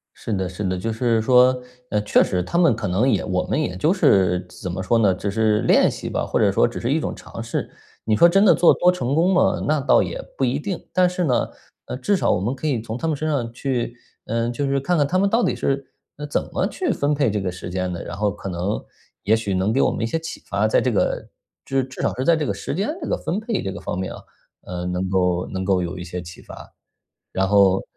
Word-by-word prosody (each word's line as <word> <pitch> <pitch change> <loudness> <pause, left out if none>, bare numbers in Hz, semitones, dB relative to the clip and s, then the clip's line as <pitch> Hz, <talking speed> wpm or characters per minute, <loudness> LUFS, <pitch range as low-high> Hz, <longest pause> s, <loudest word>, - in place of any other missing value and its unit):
是 110 - -6
的 95 -2 -1
是 95 +3 -6
的， 95 -1 0
就 115 +5 -2
是 115 0 +1
说， 125 +1 +5 0.3
呃， 105 - +1
确 105 - +4
实 90 -2 -1
他 170 - -2
们 165 -9 +5
可 110 -2 -4
能 100 +9 +2
也 105 -7 +1
我 90 0 -1
们 155 - -1
也 150 - -2
就 155 +4 +2
是 95 - +3
怎 90 - -7
么 95 +1 -3
说 115 +5 +2
呢， 100 -4 +4
就 100 +2 -3
是 110 0 +2
练 - - +4
习 - - -6
吧， - - -1
或 - - 0
者 - - +4
说 - - +3
只 - - -6
是 - - -1
一 - - +3
种 - - -3
尝 - - -9
试。 - - -3 0.3
你 110 -1 +2
说 170 - +7
真 195 +4 +4
的 - - +7
做 175 - +6
多 180 - +4
成 135 -7 -2
功 175 +5 +3
吗， 180 - +2
那 155 0 +2
倒 135 - +4
也 - - -4 0.2
不 135 - 0
一 130 +3 0
定。 180 +3 -4
但 180 -1 +4
是 180 0 -2
呢， 130 -5 +1 0.4
呃， - - -5
至 200 +10 +1
少 - - +1
我 - - +2
们 115 +7 -1
可 155 - -4
以 135 -6 0
从 110 +1 -5
他 165 - -3
们 155 - 0
身 155 +3 -2
上 125 -6 -1
去， 120 -1 -2 0.3
嗯， 115 +1 -1
就 140 +3 -2
是 135 0 +1
看 175 +6 0
看 145 -2 +3
他 185 +6 0
们 200 +1 +3
到 230 +3 +2
底 - - +1
是， 135 -1 -2 0.2
嗯， 150 - -6
怎 - - 0
么 - - 0
去 370 - -2
分 145 +1 +1
配 140 -5 +1
这 105 0 -1
个 95 -2 -2
时 90 -1 -8
间 90 0 -2
的， 85 - -5
然 - - -7
后 105 0 0
可 95 - -8
能， 90 +4 -2 0.4
也 110 +3 +4
许 105 -3 -2
能 95 +4 +1
给 135 - +1
我 - - +3
们 - - -4
一 115 - +1
些 165 - -1
启 160 +1 -8
发， 100 +2 +1
在 110 - +3
这 130 - +1
个 110 - 0 0.4
就 135 - -3
是 135 - +3
至 130 0 -11
少 - - +1
是 130 - -2
在 170 - +5
这 155 -3 -1
个 - - 0
时 100 - -5
间 200 +5 -1
这 300 - -5
个 - - +1
分 180 - -2
配 220 - -2
这 95 - -3
个 - - -7
方 - - -4
面 95 - -4
啊， - - -9 0.5
嗯， 90 0 -4
能 90 +1 -2
够 90 -1 +1
能 95 0 -4
够 95 -2 +2
有 90 +2 -4
一 - - -6
些 90 +1 -5
启 85 0 -11
发。 - - -12 0.6
然 95 0 +1
后 100 -2 +4
115 Hz, 295 characters per minute, -22 LUFS, 95-145 Hz, 0.6 s, 说